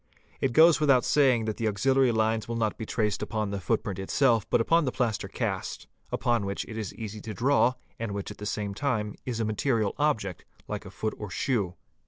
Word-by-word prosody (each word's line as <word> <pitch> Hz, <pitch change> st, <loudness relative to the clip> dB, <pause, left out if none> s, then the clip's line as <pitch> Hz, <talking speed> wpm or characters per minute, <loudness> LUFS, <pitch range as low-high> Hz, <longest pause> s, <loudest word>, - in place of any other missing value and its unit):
It 130 Hz, -3 st, 0 dB
goes 160 Hz, +2 st, +7 dB
without 135 Hz, -5 st, +4 dB
saying 130 Hz, -6 st, +3 dB
that 110 Hz, -1 st, -2 dB
the 115 Hz, -, 0 dB
auxiliary 130 Hz, +5 st, +3 dB
lines 110 Hz, -1 st, +1 dB
will 115 Hz, -, -3 dB
not 110 Hz, -2 st, 0 dB
be 110 Hz, -, -6 dB
traced 105 Hz, -3 st, 0 dB
upon 110 Hz, -3 st, -2 dB
the 100 Hz, -, -2 dB
footprint 105 Hz, 0 st, -1 dB
itself 115 Hz, +3 st, +2 dB
but -, -, +3 dB
upon 165 Hz, +9 st, +3 dB
the 130 Hz, -, 0 dB
plaster 115 Hz, -5 st, -1 dB
cast, -, -, -3 dB, 0.3 s
upon 120 Hz, -3 st, +1 dB
which 100 Hz, 0 st, -3 dB
it 110 Hz, -, -8 dB
is 110 Hz, -4 st, -4 dB
easy 110 Hz, -2 st, -6 dB
to 110 Hz, -1 st, -6 dB
draw 130 Hz, 0 st, +3 dB, 0.2 s
and 115 Hz, -2 st, -3 dB
which 100 Hz, -1 st, -4 dB
at -, -, -11 dB
the 105 Hz, -, -4 dB
same 105 Hz, -1 st, -2 dB
time 105 Hz, -4 st, -1 dB
is 120 Hz, -3 st, -2 dB
a 115 Hz, -, +1 dB
material 110 Hz, -1 st, 0 dB
object 110 Hz, -, 0 dB, 0.2 s
like -, -, -5 dB
a -, -, -8 dB
foot 110 Hz, -, -3 dB
or 105 Hz, -, -5 dB
shoe. 100 Hz, -6 st, -1 dB
110 Hz, 215 wpm, -28 LUFS, 105-125 Hz, 0.3 s, goes